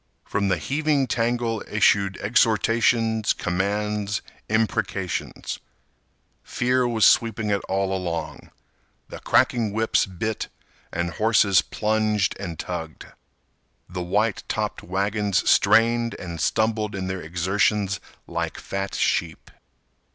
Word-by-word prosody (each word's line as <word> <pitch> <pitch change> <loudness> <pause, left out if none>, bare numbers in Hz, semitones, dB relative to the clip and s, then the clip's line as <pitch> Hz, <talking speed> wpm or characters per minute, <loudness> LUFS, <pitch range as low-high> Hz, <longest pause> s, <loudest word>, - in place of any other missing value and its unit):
From 100 0 -1
the 95 -2 +2
heaving 145 - 0
tangle 115 -1 -1
issued 100 -2 +2
exhortations, 115 0 +2
commands, 100 +2 -1 0.3
imprecations. 105 -4 -2 0.8
Fear 125 0 +1
was 115 -3 +3
sweeping 110 -2 +3
it 100 -2 +1
all 95 0 0
along. 85 -3 -4 0.6
The - - -8
cracking 115 -4 +2
whips 110 -1 +2
bit 105 +4 -3 0.4
and 85 0 -2
horses 110 -1 +4
plunged 110 -2 0
and 85 -5 -5
tugged. 80 -2 -6 0.8
The 90 0 -5
white 100 +4 0
topped - - -2
wagons 100 +2 0
strained 115 +1 +4
and 85 -3 -6
stumbled 110 +1 0
in 95 -1 -3
their 95 0 -3
exertions 95 +4 0 0.3
like - - -3
fat 100 0 -4
sheep. 80 -1 -1
105 Hz, 105 wpm, -24 LUFS, 95-110 Hz, 0.8 s, horses